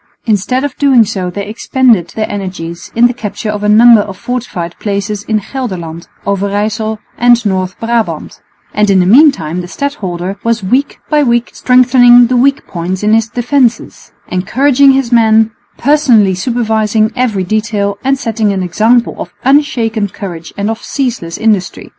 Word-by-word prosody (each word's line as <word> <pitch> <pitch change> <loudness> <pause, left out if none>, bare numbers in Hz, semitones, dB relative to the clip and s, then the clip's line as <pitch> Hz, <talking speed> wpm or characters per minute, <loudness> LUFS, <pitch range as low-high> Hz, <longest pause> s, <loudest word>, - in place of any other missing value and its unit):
Instead 230 +4 0
of 285 -3 -3
doing 265 -5 +4
so 190 -4 -4
they 200 +3 -5
expended 225 -3 +1
their 215 -1 -2
energies 185 -1 -6
in 235 +1 +4
the 245 - +2
capture 215 -2 -5
of 210 -1 -5
a 210 - +1
number 225 +1 +6
of 195 -2 -7
fortified 205 -9 -5
places 205 0 -3
in 215 -1 0
Gelderland, 175 -11 -5 0.2
Overyssel 205 +2 -2 0.2
and 240 -1 +3
North 190 -1 -2
Brabant; 230 -1 -3 0.3
and 210 -1 +1
in 195 -1 +4
the 180 - +2
meantime 185 - +3
the 175 - -8
stadholder 195 -7 -4
was 230 -2 -1
week 255 +9 0
by 300 -1 +2
week 240 -3 0
strengthening 245 -1 +5
the 250 +2 -1
weak 275 +3 +1
points 180 +2 -4
in 210 +1 +2
his 225 0 +2
defences, 245 +1 -1 0.2
encouraging 270 +8 +2
his 265 -3 -1
men, 225 -1 +3 0.3
personally 250 -9 +3
supervising 220 0 0
every 230 -7 -1
detail 205 0 -2
and 270 +1 +1
setting 220 -4 -1
an 190 -1 -2
example 225 +7 +1
of - - -6
unshaken 245 -6 +1
courage 175 -4 -8
and 205 +2 -1
of 225 - -6
ceaseless 240 - -3
industry. 210 -5 -1
220 Hz, 160 wpm, -12 LUFS, 200-245 Hz, 0.3 s, number